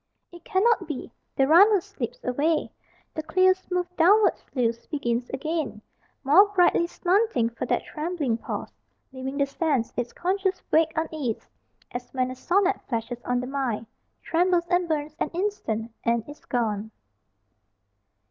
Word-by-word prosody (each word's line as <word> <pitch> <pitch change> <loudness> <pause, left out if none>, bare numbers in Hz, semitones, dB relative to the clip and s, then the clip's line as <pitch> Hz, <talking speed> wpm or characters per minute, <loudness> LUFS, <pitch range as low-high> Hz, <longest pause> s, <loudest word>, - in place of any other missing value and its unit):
It 345 -1 -13
cannot 440 +4 +2
be. 295 -5 -5 0.2
The 270 - +3
runnel 395 +7 +7
slips - - -6
away: 300 +6 0 0.4
The 315 - -3
clear 370 +4 +4
smooth 360 -1 -3
downward 400 +6 +5
sluice 235 -3 -2
begins 245 -5 -2
again, 280 -5 -3 0.4
More 320 +10 +7
brightly 355 -3 +3
slanting 360 - +1
for 230 - -5
that - - +1
trembling 305 -7 -2
pause, - - -5 0.4
Leaving 265 +1 -5
the 280 - +3
sense 275 -4 -1
its 245 -1 -2
conscious 380 +1 -1
vague 320 0 +4
unease 310 -7 -3 0.4
As 245 0 -6
when 255 0 0
a - - -6
sonnet 385 +7 +1
flashes 240 0 -3
on 245 0 0
the - - -4
mind, 255 -5 -2 0.4
Trembles 350 +1 +2
and 355 -1 +2
burns 305 -1 -2
an - - 0
instant, 235 - -2
and 235 -1 0
is 290 +1 -10
gone. 220 -4 -1
305 Hz, 145 wpm, -26 LUFS, 245-360 Hz, 0.4 s, runnel